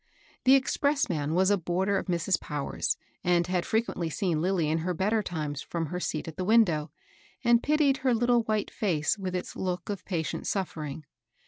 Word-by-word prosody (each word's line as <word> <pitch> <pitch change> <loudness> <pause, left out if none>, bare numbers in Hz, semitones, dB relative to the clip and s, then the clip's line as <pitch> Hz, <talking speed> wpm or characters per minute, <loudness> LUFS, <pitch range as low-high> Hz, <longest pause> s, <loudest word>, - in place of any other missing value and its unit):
The 260 +1 +8
expressman 265 - +1
was 190 +2 +4
a 200 - +3
boarder 190 +4 0
of - - -7
Mrs. 175 +1 0
Powers, 145 -2 -2 0.3
and 175 -1 +3
had 180 0 -1
frequently 220 -7 0
seen 165 -1 -1
Lilly 180 -3 +1
in 160 +2 +1
her 180 +2 -2
better 210 +5 +1
times 150 -7 -4
from 170 -1 -3
her 180 +4 -4
seat 155 -3 -3
at 160 - -8
the 185 - -1
window^ 180 -8 +3 0.5
and 235 -1 +5
pitied 295 -2 +3
her 260 -3 +2
little 240 +1 +3
white 215 -2 -1
face 165 -8 0
with 185 -1 -3
its 180 - -4
look 180 -1 -3
of 200 -3 -4
patient 165 -5 -3
suffering. 155 -6 -3
180 Hz, 185 wpm, -28 LUFS, 165-215 Hz, 0.5 s, The